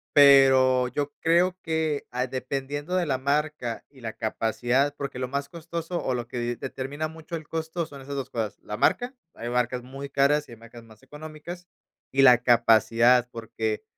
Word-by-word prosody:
pero 135 -3 +6
yo 145 +3 -3
creo 175 +3 +3
que, 160 -3 -1
ah, 125 +1 -1
dependiendo 140 +6 -4
de 180 -2 +1
la 135 -3 0
marca 140 -3 -1
y 135 -2 -19
la 115 -2 -6
capacidad, 120 +6 0
porque 140 -2 -5
lo 130 - -2
más 140 +1 -3
costoso 170 +1 -5
o 130 - -1
lo 120 -1 -4
que 125 - -6
de 120 0 -2
determina 135 +5 -5
mucho 160 +1 -8
el 155 -2 -6
costo 165 +2 -3
son 140 -3 -12
esas 140 +1 -7
2 135 -2 -4
cosas, 110 -3 -3
la 105 - -5
marca, 245 +1 +1 0.2
hay 120 +1 -6
marcas 125 0 -1
muy 135 +2 -8
caras 145 +2 +2
y 120 - -11
hay - - -12
marcas 115 +1 -13
más 110 +2 -18
económicas, 155 +5 -9 0.4
y 135 - +2
la 125 -2 +8
capacidad 120 +1 +4
porque 110 -1 -4
135 Hz, 185 wpm, -26 LUFS, 120-150 Hz, 0.4 s, la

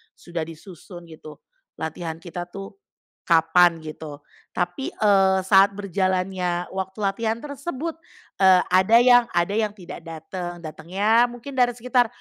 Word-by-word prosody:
sudah 170 -2 -5
disusun 175 +1 -12
gitu, 155 -1 -12 0.4
latihan 160 +1 -5
kita 175 0 -6
tuh 195 - -10 0.5
kapan 170 +1 +4
gitu. 155 -2 -9 0.3
Tapi, 175 +9 -2
eee, 195 -2 +3
saat 195 +1 +5
berjalannya 185 -2 -2
waktu 190 +1 -5
latihan 220 +3 0
tersebut, 295 +2 -5 0.4
eee, 190 -2 +6
ada 190 +5 +5
yang 245 -1 +6
ada 175 +2 +1
yang 210 0 -1
tidak 180 -4 -10
dateng, 170 +2 -8
datangnya 195 +9 +1
mungkin 245 +3 -10
dari 245 -2 +1
sekitar 245 0 +1
190 Hz, 130 wpm, -23 LUFS, 175-220 Hz, 0.5 s, eee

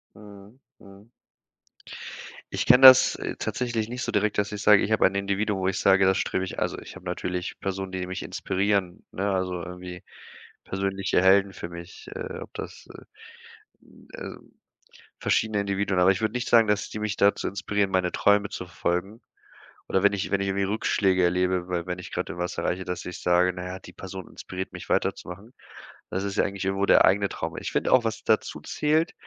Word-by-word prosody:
Mhm, 105 +3 -14 0.2
mhm. 100 +2 -16 1.5
Ich - - -2
kenne 125 +2 +8
das 130 0 +9 0.2
tatsächlich 120 -3 -2
nicht 125 +2 -4
so - - -2
direkt, 105 0 0
dass 100 0 0
ich 105 -1 -5
sage, 105 -1 +6
ich 105 - -2
habe 110 - +5
ein 95 - -5
Individuum, 100 +1 -1
wo 95 - 0
ich 95 - -1
sage, 95 0 +4
das 95 0 +3
strebe 95 - -1
ich - - -6
also, - - -1
ich - - -10
habe - - -12
natürlich 90 0 -4
Personen, 95 0 -4
die 95 -1 -3
mich 95 0 -5
inspirieren, 95 -2 -1
ne, 100 +2 -2
also 90 -2 -2
irgendwie 90 0 -8 0.6
persönliche 95 0 -1
Helden 95 +1 +5
für 85 - -7
mich, 85 +1 -11
äh, 470 0 -5
ob - - -10
das - - -8
äh, 435 +1 -16 1.0
ähm, 480 - -10 0.7
verschiedene 110 -2 +1
Individuen. 100 -1 -1
Aber 90 +1 +6
ich 95 - -5
würde 110 0 -1
nicht 125 0 -2
sagen, 115 -2 +5
dass 105 0 0
die 110 - -5
mich 105 -1 -2
dazu 100 0 +2
inspirieren, 100 +1 -1
meine 90 -1 +1
Träume 105 0 +3
zu 90 - -6
verfolgen 90 +5 -3 0.7
oder 95 +1 +1
wenn 100 - +5
ich 100 0 -3
wenn 100 - +1
ich 100 - -1
irgendwie 100 +1 0
Rückschläge 95 -2 +1
erlebe, 90 0 +1
weil 90 -1 -2
wenn 90 0 -3
ich 90 - -9
grad - - -3
irgendwas 90 +1 -4
erreiche, 95 +1 -1
dass 90 -1 -5
ich 90 - -7
sage: 90 +1 +3
„Na 90 0 -7
ja, 90 +1 -6
die - - -13
Person 95 -1 -8
inspiriert 95 0 -7
mich, - - -9
weiterzumachen.“ 100 +7 -2 0.6
Das 95 - -2
ist 100 0 -3
ja - - +3
eigentlich 100 -1 -4
irgendwo 95 +1 0
der - - +6
eigene 100 +1 +3
Traum. - - -5
Ich - - -5
find - - 0
auch, 130 -2 +5
was 110 - -3
dazu - - 0
zählt, 155 +3 0
95 Hz, 195 wpm, -26 LUFS, 90-105 Hz, 1.5 s, das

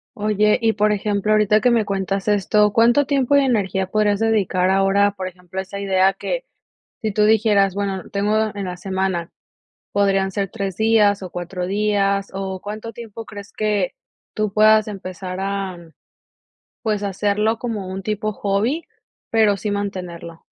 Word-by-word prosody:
Oye, 210 0 +2
y, 225 -1 +3
por 210 +1 +2
ejemplo, 210 0 0
ahorita 215 0 +4
que 250 - +4
me 230 -3 +2
cuentas 195 0 -2
esto, 210 +1 +3
¿cuánto 240 +5 +4
tiempo 280 -1 +2
y 280 - +6
energía 195 -7 0
podrías 205 0 +1
dedicar 200 -5 +1
ahora, 195 +1 +3
por 190 -2 -5
ejemplo, 180 0 -8
a - - +1
esa 195 +1 -7
idea 195 -1 +3
que, - - -4 0.6
si 220 -3 -1
tú 210 +1 +2
dijeras: 210 -3 +3
"Bueno, 195 -2 -3
tengo 210 +2 +1
en 200 - -4
la 180 -1 -5
semana 190 -2 -2 0.6
podrían 195 -1 +2
ser 195 0 -2
tres 195 -5 -4
días 215 -2 +3
o 185 - -6
cuatro 180 +1 -4
días", 200 0 +1
o 190 -1 -4
cuánto 215 +3 -6
tiempo 230 -1 -9
crees 205 -2 -10
que 210 -4 -1 0.4
tú 215 -2 -1
puedas 215 +1 +5
empezar 185 -2 -6
a 195 -1 -3 1.1
pues, 210 -3 -1
hacerlo 205 +3 0
como 220 -6 -4
un 190 +1 -5
tipo 215 +1 -2
hobby, 215 - -1 0.5
pero 215 -3 +3
sí 210 +2 -3
mantenerlo? 180 -5 -5
205 Hz, 160 wpm, -21 LUFS, 190-215 Hz, 1.1 s, y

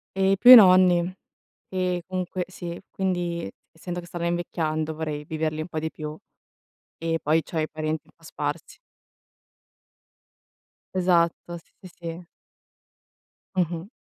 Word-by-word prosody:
E 195 0 +3
più 250 - +9
i - - +15
nonni. 185 -4 +6 0.6
E 180 -1 -1
comunque 185 -1 -3
sì, 175 -2 -7
quindi, 175 - -2 0.2
essendo 175 +2 -6
che 175 - -9
stanno 175 -1 -4
invecchiando, 160 -2 -2
vorrei 150 -2 -4
viverli 155 0 -2
un 155 - -5
po' 160 -2 -4
di 160 0 -4
più 155 0 -7 0.8
e 165 0 -1
poi 155 +2 +2
c'ho 165 - -5
i 155 0 0
parenti 155 0 -3
un - - -22
po' - - -30
sparsi. - - -5 2.2
Esatto, 175 -1 +1
sì, 165 - -19
sì, 185 - -10
sì. 170 +1 -7 1.3
Mh-mh. 175 0 -1
170 Hz, 135 wpm, -25 LUFS, 160-180 Hz, 2.2 s, i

